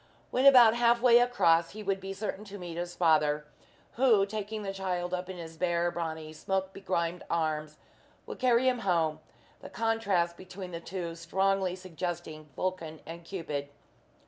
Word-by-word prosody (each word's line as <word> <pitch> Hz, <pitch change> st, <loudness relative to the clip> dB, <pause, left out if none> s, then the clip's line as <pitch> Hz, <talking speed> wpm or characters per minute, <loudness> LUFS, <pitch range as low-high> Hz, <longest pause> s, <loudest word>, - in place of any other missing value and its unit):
When 260 Hz, +2 st, +4 dB
about 245 Hz, -5 st, +9 dB
halfway 240 Hz, 0 st, +5 dB
across, 170 Hz, -10 st, +3 dB
he 215 Hz, 0 st, -7 dB
would 195 Hz, -1 st, 0 dB
be 195 Hz, 0 st, -6 dB
certain 205 Hz, +1 st, -4 dB
to 205 Hz, 0 st, -9 dB
meet 175 Hz, -3 st, -7 dB
his 175 Hz, +1 st, -4 dB
father, 150 Hz, -3 st, +3 dB, 0.5 s
who, 230 Hz, -6 st, +5 dB
taking 215 Hz, +1 st, -5 dB
the 195 Hz, -1 st, -3 dB
child 180 Hz, -2 st, -3 dB
up 180 Hz, 0 st, -3 dB
in 185 Hz, -, -6 dB
his 165 Hz, -1 st, -9 dB
bare, 175 Hz, 0 st, +1 dB
brawny, 160 Hz, -2 st, -5 dB
smoke 190 Hz, +4 st, -2 dB
begrimed 175 Hz, -3 st, -2 dB
arms, 155 Hz, -2 st, -1 dB, 0.5 s
would -, -, -8 dB
carry 255 Hz, 0 st, +3 dB
him 250 Hz, -1 st, +2 dB
home 165 Hz, -7 st, +1 dB, 0.4 s
the -, -, -10 dB
contrast 205 Hz, -7 st, 0 dB
between 185 Hz, 0 st, -9 dB
the 170 Hz, -, -5 dB
two 170 Hz, -1 st, -5 dB
strongly 190 Hz, +2 st, 0 dB
suggesting 175 Hz, -4 st, -6 dB
Vulcan 165 Hz, -4 st, -3 dB
and 170 Hz, +2 st, -8 dB
Cupid. 150 Hz, -6 st, -5 dB
180 Hz, 160 wpm, -30 LUFS, 165-200 Hz, 0.5 s, about